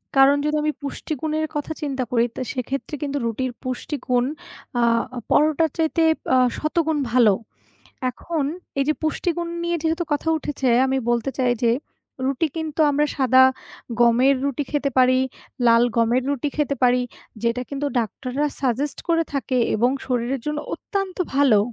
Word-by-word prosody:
কারণ 270 +1 +7
যদি 300 0 +1
আমি 305 - +2
পুষ্টিগুণের 310 +2 -3
কথা 295 +2 -3
চিন্তা 275 -3 -2
করি, 235 -1 +3
তো - - -4
সেক্ষেত্রে 270 +3 -4
কিন্তু 285 0 -2
রুটির 250 +3 -2
পুষ্টিগুণ। 255 -1 -1 0.5
আ - - +3 0.5
পরোটার 310 +2 +3
চাইতে 325 0 +1 0.3
আ - - +5 0.2
শতগুণ 315 0 0
ভালো। 235 -5 +5 0.8
এখন 310 +3 -3 0.3
এই 275 - +3
যে 305 - +3
পুষ্টিগুণ 340 +2 -1
নিয়ে 345 0 0
যেহেতু 325 +2 0
কথা 295 +2 -1
উঠেছে, 285 -3 -2 0.2
আমি 265 0 0
বলতে 240 +3 0
চাই 250 -2 +3
যে 235 - +4 0.5
রুটি 275 +4 +1
কিন্তু 320 -1 -3
আমরা 295 +1 +2
সাদা 260 -1 +5 0.6
গমের 240 +3 +5
রুটি 280 +1 -1
খেতে 290 -1 0
পারি, 255 0 +5 0.5
লাল 230 0 +6
গমের 235 +2 +3
রুটি 285 +1 -1
খেতে 295 -2 +1
পারি 250 0 +4 0.4
যেটা 235 +1 0
কিন্তু 280 +1 -2
ডাক্তাররা 255 +5 -2 0.2
suggest 275 +2 0
করে 330 -1 +3
থাকেন 260 -2 0
এবং 240 +4 +3 0.2
শরীরের 250 +1 -1
জন্য 300 0 -1 0.2
অত্যন্ত 390 -2 -4 0.2
ভালো। 275 -7 +5
275 Hz, 150 wpm, -22 LUFS, 250-305 Hz, 0.8 s, কারণ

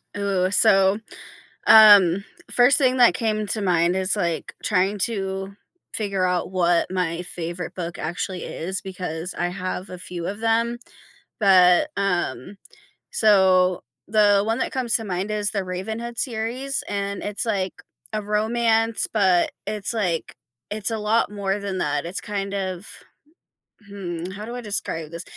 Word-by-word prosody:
Ooh, 195 -2 0
so, 195 -1 +5 0.7
um, 200 -4 +8 0.3
first 245 +3 +5
thing 260 -2 +3
that 245 -1 +6
came 215 -3 -1
to 215 - -1
mind 175 -1 +2
is, 190 +2 +2
like, 170 -5 -3
trying 200 0 +1
to 195 -2 -2 0.4
figure 200 -4 -1
out 180 0 -1
what 175 -2 +1
my 180 -2 -2
favorite 175 -1 -4
book 175 -1 -5
actually 175 +3 -4
is 190 +4 -3
because 180 -3 -5
I 175 - 0
have 185 0 -5
a 180 - -8
few 175 -1 -7
of 205 +2 -5
them, 230 +1 0 0.6
but, 185 +6 +5
um, 195 +1 -2 0.5
so, 185 -4 +3 0.2
the 205 -1 +4
one 225 +3 -1
that - - -2
comes 250 -4 0
to 225 - -5
mind 190 +2 -3
is 210 -1 0
The 195 -3 -2
Ravenhood 220 +6 -5
series, 250 +3 -2
and, 200 -1 -3
it's 205 +2 -2
like 190 -4 -2 0.3
a 215 -1 -2
romance, 225 +1 +1
but 190 -5 +2 0.2
it's 210 +1 -2
like 180 -7 -2 0.3
it's 210 +1 -1
a 225 - -2
lot 215 +1 +1
more 200 0 -2
than 195 -2 -4
that, 145 +2 -1
it's 180 - -3
kind 200 -1 -4
of 190 0 -4 1.0
hmm, 175 -3 -6
how 205 +2 -8
do 240 +1 -7
I - - -5
describe 165 -7 -3
this? 170 +2 -6
195 Hz, 150 wpm, -23 LUFS, 180-215 Hz, 1.0 s, um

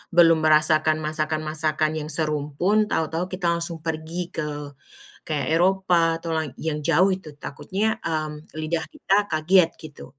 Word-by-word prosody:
belum 165 -1 +7
merasakan 155 0 +4
masakan-masakan 155 0 -1
yang 150 0 -6
serumpun 155 +7 +1
tahu-tahu 160 +2 0
kita 185 -1 -2
langsung 170 -1 -4
pergi 160 +2 -3
ke 145 -2 -5 0.5
kayak 145 -4 -2
Eropa 175 -2 +3
atau 165 0 -6
lai 160 -2 -2
yang 155 -2 -2
jauh 170 +5 +4
itu 160 -6 -11
takutnya, 205 +11 -2
mmm, 155 -1 -4
lidah 160 +1 -1
kita 270 -9 0 0.2
kaget 165 +2 +4
gitu. 155 -2 -10
160 Hz, 135 wpm, -24 LUFS, 155-170 Hz, 0.5 s, belum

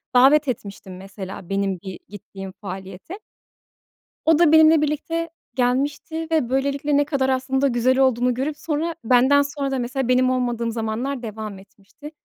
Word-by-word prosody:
davet 280 +4 +6
etmiştim 200 -6 -6
mesela, 190 -1 -9
benim 195 -2 -1
bir 190 -2 -8
gittiğim 195 -1 -9
faaliyete. 195 - -8 1.1
O 320 -1 +4
da 330 -3 +5
benimle 315 0 +7
birlikte 320 +3 -2 0.2
gelmişti 285 +6 -1
ve 310 -7 +1
böylelikle 280 +2 0
ne 290 - +3
kadar 275 -2 -1
aslında 265 +1 +1
güzel 255 +2 +2
olduğunu 250 -2 +2
görüp 290 +4 -3
sonra, 320 +2 -2
benden 260 +4 +5
sonra 285 -1 -3
da 270 - -1
mesela, 250 +1 -2
benim 255 0 +3
olmadığım 240 -2 -1
zamanlar 235 +4 -3
devam 215 -3 -6
etmişti. 200 +9 -14
255 Hz, 145 wpm, -22 LUFS, 220-290 Hz, 1.1 s, benimle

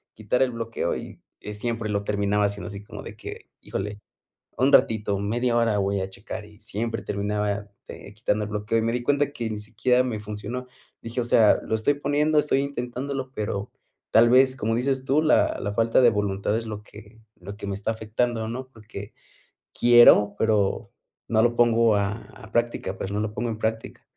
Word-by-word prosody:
quitar 110 +4 +1
el 130 - 0
bloqueo, 115 -1 -3
y - - -8 0.2
y 105 0 -7
siempre 115 0 -3
lo 100 -1 -1
terminaba 100 0 +1
haciendo 100 0 -3
así, 100 -1 -7
como - - -9
de - - -9
que: - - -9
"Híjole, 105 +2 -5 0.6
un 135 +2 +3
ratito, 105 -6 +3
media 120 +4 0
hora 115 -3 +2
voy 100 0 0
a 95 - -3
checar", 105 +2 -7
y 105 0 -17
siempre 110 +2 -4
terminaba, 105 0 -2 0.2
eh, 100 - -10
quitando 105 0 -1
el 105 - -7
bloqueo, 105 +2 -1
y 110 - +1
me 115 - +1
di 125 - -1
cuenta 145 +2 +1
que 115 -6 -3
ni 110 - -4
siquiera 115 +4 +1
me 120 -4 -3
funcionó. 105 +4 -6 0.3
Dije: 115 +2 -4
"O - - -1
sea, 110 -3 +5
lo - - -4
estoy 110 +7 +1
poniendo. 145 +2 +1
Estoy 145 -2 +1
intentándolo", 135 0 -4
pero 105 -3 -3 0.4
tal 115 +1 +6
vez, 130 +1 +5
como 115 -2 -1
dices 130 +2 0
tú, 145 +3 +3
la 155 - +3
la 100 - -3
falta 115 +3 +3
de 120 -2 +6
voluntad 105 0 -1
es 115 0 -5
lo 105 -1 -6
que 105 +2 -15 0.2
lo 100 0 -9
que 105 - -7
me 100 - -2
está 100 +2 -3
afectando, 110 +1 -2
¿no? 130 +2 -5
Porque 105 -3 -10 0.6
quiero, 120 -4 +7
pero 105 -3 +1 0.4
no 110 -1 +3
lo 120 0 +2
pongo 115 -2 +4
a 100 -1 +1 0.3
a 110 -4 -13
práctica. 120 -5 -1
Pues 95 - -4
no 105 - -1
lo 105 0 -3
pongo 120 +1 -2
en 110 - -5
práctica. 110 0 -3
110 Hz, 200 wpm, -25 LUFS, 105-120 Hz, 0.6 s, quiero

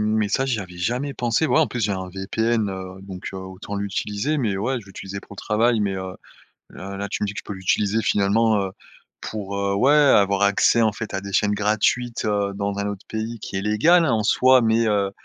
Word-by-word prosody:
mais 110 -2 +1
ça, 135 +6 +1
j'y 120 -5 -1
avais 90 -2 -9
jamais 125 +10 -2
pensé. 120 +6 0
Ouais, 135 +2 +3
en 155 - +3
plus, 120 +2 -5
j'ai 105 -1 +1
un 95 -1 -4
VPN, 110 +3 -1
heu, 95 0 -7
donc 95 -2 -7
heu, - - -5
autant 95 +2 -7
l'utiliser. 105 +7 -2
Mais 110 -7 0
ouais, 125 +5 -1
je 105 - -15
l'utilisais 95 0 -7
pour 100 - -14
le - - -25
travail, 115 +2 +2
mais, 100 -2 0
heu 95 0 -6 0.6
heu, 95 +1 -7
là, 100 0 -3
tu 105 - -2
me - - +2
dis 100 - -4
que - - -5
je - - -11
peux - - -5
l'utiliser 100 +3 0
finalement, 105 +1 +2
heu, 95 -1 -3 0.5
pour, 100 -2 -5
heu 100 0 0
ouais, 135 +8 +4
avoir 100 -10 +4
accès 100 +3 +4
en 110 - +3
fait 110 - -6
à 95 - -2
des 100 -1 -8
chaînes 105 0 +2
gratuites, 110 +4 0
heu, 100 -1 0
dans 100 0 -2
un 100 0 -1
autre 100 -1 -6
pays 110 +1 -4
qui 100 - -7
est - - -2
légal, 160 - +4
hein, 140 - +1
en 110 -2 +1
soi, 130 +2 +5
mais 115 0 +2
heu 100 -2 +1
105 Hz, 240 wpm, -23 LUFS, 100-115 Hz, 0.6 s, soi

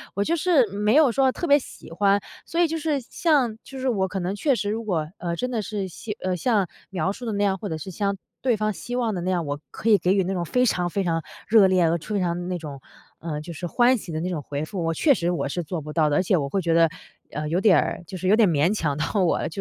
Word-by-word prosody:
我 200 - +1
就 330 - +1
是 330 -6 +3
没 210 +4 +1
有 300 -4 +6
说 265 +2 +3
特 345 - -4
别 285 -3 +5
喜 250 - -12
欢。 200 +3 +3 0.3
所 335 - -3
以 345 - +5
就 325 - -3
是 305 -2 0
像 260 -3 +1
就 270 - -10
是 260 - -2
我 200 -6 +1
可 190 +1 -4
能 185 +2 -2
确 275 +5 +2
实 205 -3 -2
如 225 +2 -3
果， 170 -8 -1
呃， 170 -1 -2
真 250 +8 -3
的 230 -3 -1
是 205 -2 -4
像 205 +4 -7
呃， 185 0 0
像 205 0 +1 0.2
描 185 -1 -1
述 245 - -9
的 220 - -1
那 205 0 0
样， 195 -1 +2
或 205 - -5
者 160 - -3
是 190 +5 -7
像 200 +2 -1 0.2
对 250 -4 +2
方 215 0 0
希 245 +4 -6
望 235 -3 0
的 180 - -3
那 180 - -2
样， 175 -3 0
我 145 0 -3
可 225 - -3
以 210 -2 +6
给 180 - +1
予 195 - +3
那 190 +2 -2
种 175 -2 -1
非 250 +9 +1
常 180 -6 +1
非 195 +3 -1
常 165 -2 0 0.3
热 215 -3 +6
烈、 185 -1 +3
呃， 165 +1 +2
非 205 +5 -3
常 175 -1 -2
那 180 - -1
种 145 -5 -8 0.6
就 170 +2 -7
是， 175 +3 -5
呃， - - -12
欢 245 +5 +4
喜 195 -5 -8
的 155 - -2
那 180 - -2
种 165 -4 -3
回 145 +1 -4
复， 180 +1 -4
我 165 - 0
确 290 - +4
实 175 -8 -1
我 175 - -1
是 175 +5 -3
做 165 +1 -4
不 150 +1 -8
到 155 -2 +3
的。 145 - +1
而 - - +2
且 190 +1 +2
我 140 -3 -2
会 195 - 0
觉 165 -2 +1
得， 165 0 +5 0.4
呃， 150 0 -3
有 175 +4 +1
点 195 -6 +6
儿， - - -2
就 190 - -6
是 185 - -3
有 200 - +6
点 220 -4 +4
勉 160 +4 +2
强 150 -8 -1
到 190 +6 0
我 175 - +2
了， - - -2
190 Hz, 315 characters per minute, -24 LUFS, 170-225 Hz, 0.6 s, 有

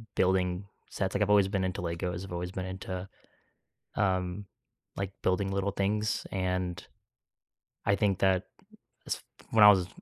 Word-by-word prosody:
building 90 0 +2 0.2
sets, 95 -1 -2
like, 100 - +1
I've 105 - +2
always 100 -2 +6
been 95 -1 0
into 90 -1 -2
Legos. 90 +2 -3
I've 95 - -8
always 90 +1 -3
been 95 -1 -4
into, 95 0 -5 0.9
um, 95 0 0 0.5
like, 100 0 -2
building 95 +1 +1
little 100 +1 0
things, 105 +2 0
and 90 -1 -2 1.0
I 100 - +4
think 100 -2 +1
that 95 -1 +3 0.6
s - - -2 0.3
when 110 -2 +6
I 105 - +12
was 95 -3 +2
95 Hz, 150 wpm, -30 LUFS, 90-100 Hz, 1.0 s, I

